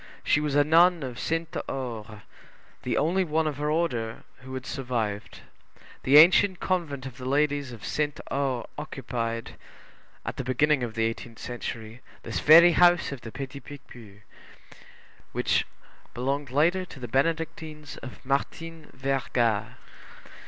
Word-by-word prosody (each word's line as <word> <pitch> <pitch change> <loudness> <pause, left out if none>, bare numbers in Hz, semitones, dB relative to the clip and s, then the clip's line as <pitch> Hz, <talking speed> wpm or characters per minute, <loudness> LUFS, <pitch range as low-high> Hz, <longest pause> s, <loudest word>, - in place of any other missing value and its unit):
She - - +3
was 150 -2 -1
a 145 - +6
nun 165 +2 +5
of 125 -2 -6
Sainte 165 0 -2
Aure, 115 -5 -6 0.6
the - - -1
only 180 +6 +2
one 160 -1 0
of 150 -2 -2
her 150 +1 -1
order 125 -9 -1
who 130 +1 -9
had 130 0 -6
survived. 115 -7 -3 0.6
The 140 +3 +6
ancient 180 +3 +7
convent 160 -8 -2
of 130 -1 -9
the 125 - -7
ladies 145 -1 +1
of 110 -2 -9
Sainte 150 -1 -1
Aure 135 -4 -1
occupied, 120 -5 -4 0.7
at - - -4
the - - -3
beginning 135 +3 +2
of 115 -2 -4
the 115 -1 +1
eighteenth 115 0 -5
century, 120 -1 -6 0.2
this - - -3
very 170 +3 +8
house 175 -1 +4
of 135 -4 -6
the 110 - -8
Petit 135 +2 -6
Picpus, 120 -8 -13 1.1
which - - +1 0.5
belonged 135 +3 -2
later 165 +8 +2
to 160 -6 -11
the 120 - -5
Benedictines 155 +2 -2
of 130 - -10
Martin 160 +4 -3
Verga. 130 -5 0
140 Hz, 145 wpm, -27 LUFS, 120-155 Hz, 1.1 s, very